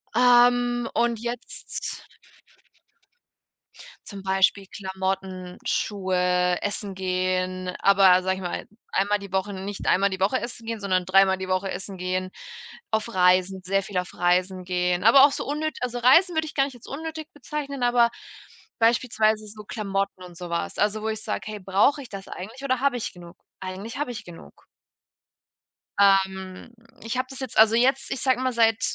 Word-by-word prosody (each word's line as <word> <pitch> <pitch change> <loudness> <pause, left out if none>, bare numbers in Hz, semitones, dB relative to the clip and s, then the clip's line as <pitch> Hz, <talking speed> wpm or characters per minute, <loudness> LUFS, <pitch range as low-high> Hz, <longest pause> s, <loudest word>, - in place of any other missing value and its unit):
Ähm, 245 0 +4
und 235 -1 +1
jetzt 240 +1 -6 2.0
Zum 200 -2 -8
Beispiel 190 +1 +2
Klamotten, 190 -2 -4
Schuhe, 180 -2 +1
Essen 205 -1 -3
gehen, 185 0 -2
aber 190 -2 +5
sage 190 0 0
ich 190 - -8
mal, 175 -1 -4 0.3
einmal 205 +1 +1
die 200 -2 -11
Woche 190 +1 -1
nicht 195 +1 -6
einmal 200 +2 +3
die 190 - -5
Woche 200 +7 +1
essen 235 -1 -7
gehen, 225 -2 -4
sondern 185 -2 0
dreimal 190 +1 +4
die 190 - -5
Woche 185 +1 -1
essen 190 +1 -6
gehen, 185 +1 -2 0.6
auf 220 +1 -1
Reisen, 185 +1 +3
sehr 195 +2 +1
viel 195 -1 -5
auf 180 -1 -3
Reisen 180 +1 +1
gehen. 180 0 0
Aber 265 +5 +9
auch 285 - +3
so - - -4
unnöt 305 +2 -3
also, 245 -1 -2
Reisen 335 +9 +5
würde 315 0 +1
ich - - -8
gar 275 -1 +3
nicht 270 - -8
als 240 - -15
unnötig 315 +2 -6
bezeichnen, 280 -2 -5
aber 240 -1 +4 0.7
beispielsweise 220 -2 +2
so 210 0 -10
Klamotten 195 -3 -3
und 175 -2 -12
so 175 -1 -7
was. 170 0 -3
Also, 210 +1 +1
wo 220 - -3
ich 220 0 -4
sage: - - -3
„Hey, 215 -1 -6
brauche 195 +10 +2
ich 255 - -11
das 195 -1 -8
eigentlich 225 +9 -9
oder 260 -2 0
habe 275 -3 +2
ich 235 - -4
genug?“ 175 0 -13 0.2
Eigentlich 190 +5 -6
habe 295 -4 -2
ich 240 - -8
genug. 175 -1 -14 1.3
Ähm, 190 +1 +2 0.3
ich 225 +2 -3
habe 255 0 -1
das 265 - -9
jetzt 260 -3 -6
also, 220 +1 +6
jetzt, 265 +3 +2
ich 265 - -3
sage 260 -2 +2
mal, 255 -1 0
seit 225 -2 +3
200 Hz, 170 wpm, -25 LUFS, 185-240 Hz, 2.0 s, Aber